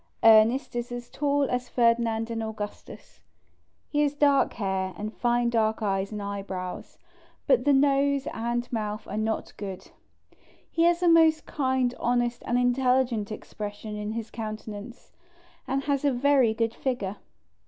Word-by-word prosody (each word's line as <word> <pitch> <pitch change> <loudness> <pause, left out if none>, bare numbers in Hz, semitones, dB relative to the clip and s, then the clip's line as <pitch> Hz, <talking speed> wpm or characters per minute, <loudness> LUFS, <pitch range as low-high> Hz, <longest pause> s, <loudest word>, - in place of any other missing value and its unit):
Ernest 225 +4 +5
is 240 +1 -3
as 245 0 -7
tall 285 0 +1
as 250 -2 -2
Ferdinand 230 -1 +1
and 225 0 -2
Augustus; 220 -2 -8 0.7
he 295 - 0
has 290 -1 +1
dark 285 -2 +3
hair, 190 -2 -2
and 215 +2 -5
fine 240 0 +1
dark 220 -1 +1
eyes 195 -1 -1
and 210 -1 -5
eyebrows, 195 -2 -6 0.5
but - - +3
the 290 - +5
nose 280 0 +3
and 240 +2 -3
mouth 215 -1 -3
are - - -5
not 220 +1 -2
good; 195 -3 -7 0.8
he 335 0 +2
has 345 +1 +3
a - - +4
most 325 -2 +5
kind, 260 -3 0
honest 240 0 0
and 240 - +1
intelligent 245 -3 +1
expression 210 0 -7
in 210 +1 -4
his 225 -1 -5
countenance, 215 +1 -7 0.6
and 270 +1 -1
has 280 -1 0
a 285 - +3
very 265 -2 +3
good 230 0 0
figure. 210 -8 -3
235 Hz, 150 wpm, -27 LUFS, 215-270 Hz, 0.8 s, Ernest